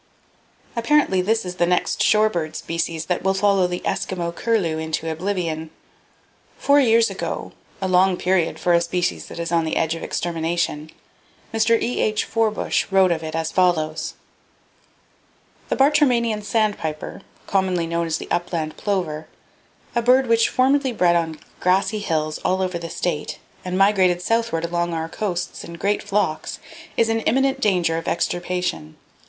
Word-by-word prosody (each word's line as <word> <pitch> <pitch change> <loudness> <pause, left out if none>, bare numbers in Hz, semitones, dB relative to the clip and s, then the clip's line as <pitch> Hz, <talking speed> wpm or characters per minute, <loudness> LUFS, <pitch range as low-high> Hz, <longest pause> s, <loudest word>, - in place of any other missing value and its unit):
—Apparently 235 -5 +3
this 220 +3 0
is 180 0 -6
the 175 - +2
next 180 +3 +1
shore 215 +1 +5
bird 165 -6 -3
species 165 -1 -3
that 180 0 -1
will 190 0 +1
follow 195 -2 +3
the 180 0 -4
Eskimo 170 -2 -2
curlew 180 -8 0
into 160 0 -2
[Page 160 0 -3
21] - - -17
oblivion. 165 -4 -2 0.9
Four 285 +1 +4
years 230 -3 +4
ago,—a 190 - -6
long 185 0 +3
period 180 -2 +1
for 175 - +1
a 170 - +4
species 175 +1 -1
that - - -9
is 170 0 -3
on 170 -1 +2
the 160 - -2
edge 160 0 +1
of 165 - -6
extermination,—Mr. 170 +7 -2
E.H. 215 -3 0
Forbush 220 -2 0
[B] 195 - -5
wrote 190 -2 +5
of 165 -2 0
it 160 0 -5
as 160 0 -1
follows: 160 -3 +1 1.5
"The - - +1
Bartramian 250 -6 +3
Sandpiper, 205 -8 -2 0.2
commonly 185 -3 +1
known 170 0 -1
as 160 - 0
the - - -9
Upland 165 -3 -2
Plover, 175 -7 -2 0.7
a 235 - +3
bird 255 +3 +4
which 230 -1 +3
formerly 265 +1 +2
bred 175 -5 +3
on 160 -2 -1 0.2
grassy 195 +4 +2
hills 155 -6 -1
all 190 0 0
over 180 -2 -2
the 170 0 -6
State 165 -4 -3 0.3
and 185 0 -2
migrated 190 -3 +4
southward 225 -8 0
along 170 0 -1
our 160 0 -2
coasts 180 -2 -3
in 170 - -8
great 200 +4 0
flocks, 200 -6 -1 0.4
is 230 - +4
in 225 0 +1
imminent 270 +4 +1
danger 175 -5 +2
of 165 - -10
extirpation. 175 - -2
180 Hz, 160 wpm, -22 LUFS, 165-215 Hz, 1.5 s, shore